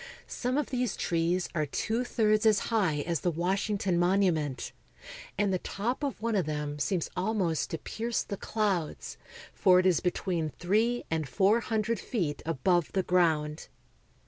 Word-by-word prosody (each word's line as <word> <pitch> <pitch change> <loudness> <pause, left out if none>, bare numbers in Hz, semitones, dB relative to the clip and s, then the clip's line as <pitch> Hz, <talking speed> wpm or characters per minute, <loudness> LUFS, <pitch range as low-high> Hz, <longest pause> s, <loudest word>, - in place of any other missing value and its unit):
Some 250 +2 -2
of 295 - -1
these 250 -4 -1
trees 170 +2 0
are 155 -3 0
two 225 - -1
thirds 215 -2 +2
as 215 -2 +5 0.2
high 180 -10 +2
as 170 +1 -1
the 180 - 0
Washington 190 +2 0
Monument, 175 -7 +1 0.7
and 200 -1 +1
the 185 - +1
top 230 +11 -3
of 280 -6 -2
one 230 0 -1
of 185 -6 +1
them 150 -1 -3
seems 175 +3 0
almost 185 -5 0
to 165 - -3
pierce 230 +7 -3
the 200 - -5
clouds, 195 -6 -2 0.3
for 185 -2 +5
it 185 - +3
is 180 -4 +4
between 175 -3 -1
three 220 - 0
and 160 -4 -1
four 200 - +3
hundredfeetabove 180 - -1
the 190 - +1
ground. 160 -4 +1
185 Hz, 150 wpm, -29 LUFS, 165-215 Hz, 0.7 s, as